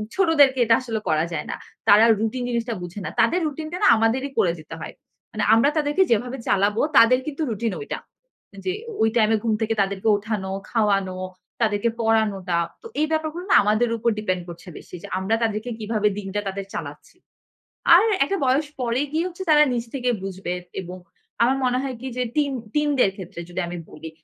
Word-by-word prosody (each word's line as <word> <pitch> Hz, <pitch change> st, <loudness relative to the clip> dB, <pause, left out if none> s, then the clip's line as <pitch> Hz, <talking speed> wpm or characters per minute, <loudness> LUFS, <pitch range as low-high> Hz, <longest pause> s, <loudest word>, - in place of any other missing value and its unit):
ছোটদেরকে 295 Hz, -8 st, +4 dB
এটা 230 Hz, 0 st, +5 dB
আসলে 225 Hz, -3 st, -3 dB
করা 155 Hz, +1 st, +2 dB
যায় -, -, -3 dB
না। -, -, -3 dB, 0.3 s
তারা 210 Hz, +2 st, +7 dB
রুটিন 225 Hz, +3 st, -2 dB
জিনিসটা 235 Hz, 0 st, -1 dB
বুঝে 175 Hz, +3 st, -7 dB
না। -, -, -2 dB
তাদের 230 Hz, +11 st, +3 dB
রুটিন 310 Hz, +1 st, -5 dB
টা 360 Hz, -, -2 dB
না -, -, +6 dB
আমাদেরই 235 Hz, +5 st, +1 dB
করে 175 Hz, -, +3 dB
দিতে 155 Hz, +1 st, -9 dB
হয়। -, -, -7 dB, 0.4 s
মানে 215 Hz, -, -2 dB
আমরা 230 Hz, +5 st, +5 dB
তাদেরকে 300 Hz, +5 st, +2 dB
যেভাবে 245 Hz, +4 st, 0 dB
চালাবো 205 Hz, +2 st, +2 dB, 0.2 s
তাদের 250 Hz, +2 st, +7 dB
কিন্তু 300 Hz, +1 st, -4 dB
রুটিন 225 Hz, 0 st, -2 dB
ওইটা। 430 Hz, -, -5 dB, 0.7 s
যে 370 Hz, -, 0 dB, 0.3 s
ওই 220 Hz, -, +4 dB
টাইমে 220 Hz, 0 st, +4 dB
ঘুম 225 Hz, -2 st, +1 dB
থেকে 225 Hz, 0 st, +1 dB
তাদেরকে 195 Hz, +1 st, -2 dB
উঠানো, 205 Hz, -2 st, -4 dB, 0.2 s
খাওয়ানো, 195 Hz, -5 st, +1 dB, 0.4 s
তাদেরকে 215 Hz, 0 st, +2 dB
পড়ানোটা। 210 Hz, -5 st, +1 dB, 0.2 s
তো -, -, -9 dB
এই 310 Hz, -, +2 dB
ব্যাপারগুলো 315 Hz, +2 st, -2 dB
না -, -, +7 dB
আমাদের 215 Hz, +3 st, +2 dB
উপর 235 Hz, +1 st, +1 dB
ডিপেন্ড 185 Hz, -4 st, -1 dB
করছে 170 Hz, +2 st, -11 dB
বেশি। -, -, -11 dB
যে -, -, -7 dB
আমরা 195 Hz, +4 st, 0 dB
তাদেরকে 220 Hz, +1 st, -2 dB
কিভাবে 215 Hz, -1 st, 0 dB
দিনটা 200 Hz, 0 st, -4 dB
তাদের 195 Hz, 0 st, -4 dB
চালাচ্ছি। 145 Hz, -, -8 dB, 0.8 s
আর 360 Hz, +5 st, +7 dB, 0.2 s
একটা 395 Hz, +8 st, -1 dB
বয়স 270 Hz, +4 st, +2 dB
পরে 240 Hz, 0 st, 0 dB
গিয়ে 325 Hz, +3 st, 0 dB
হচ্ছে 360 Hz, +1 st, -8 dB
তারা 300 Hz, -1 st, +7 dB
নিজ 235 Hz, -1 st, -1 dB
থেকে 250 Hz, -2 st, 0 dB
বুঝবে। 190 Hz, -2 st, -4 dB, 0.3 s
এবং 180 Hz, 0 st, -8 dB, 0.5 s
আমার 260 Hz, +3 st, +3 dB
মনে 250 Hz, 0 st, +1 dB
হয় 265 Hz, -2 st, -4 dB
কি 265 Hz, -, -5 dB
যে 250 Hz, -, 0 dB
টিন 290 Hz, -2 st, +2 dB, 0.2 s
টিনদের 290 Hz, -8 st, +2 dB
ক্ষেত্রে 180 Hz, -3 st, -8 dB
যদি 175 Hz, +1 st, -4 dB
আমি 175 Hz, -, -5 dB
বলি, 160 Hz, -, -9 dB
225 Hz, 190 wpm, -23 LUFS, 200-265 Hz, 0.8 s, তারা